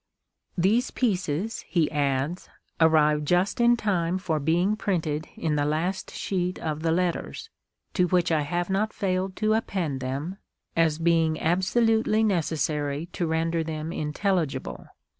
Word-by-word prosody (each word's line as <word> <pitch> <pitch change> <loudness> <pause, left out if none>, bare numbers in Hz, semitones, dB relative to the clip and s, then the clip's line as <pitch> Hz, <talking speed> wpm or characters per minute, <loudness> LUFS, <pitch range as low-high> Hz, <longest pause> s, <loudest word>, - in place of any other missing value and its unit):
" - - -58
These 215 +8 +2
pieces," 195 - -1
he 165 -4 +1
adds, 145 +3 -1 0.3
"arrived 150 -2 +4
just 180 +7 +2
in 240 0 +5
time 185 -5 0
for 165 -5 -1
being 175 +8 +2
printed 160 -7 -2
in 155 -2 -1
the 145 - +2
last 165 +6 -1
sheet 180 -1 -2
of 155 -1 -3
the 165 0 +1
Letters, 180 - -1 0.5
to 180 -2 +2
which 175 -1 +2
I 155 -2 +3
have 175 +4 -2
not 210 +3 0
failed 185 -1 -1
to 215 0 +1
append 180 -10 -1
them, 140 +9 -4 0.4
as 165 -2 +3
being 165 -1 +2
absolutely 220 +5 +2
necessary 155 -5 -1
to 170 - -1
render 165 +1 0
them 160 0 -4
intelligible. 155 -3 -2
170 Hz, 140 wpm, -26 LUFS, 155-190 Hz, 0.5 s, in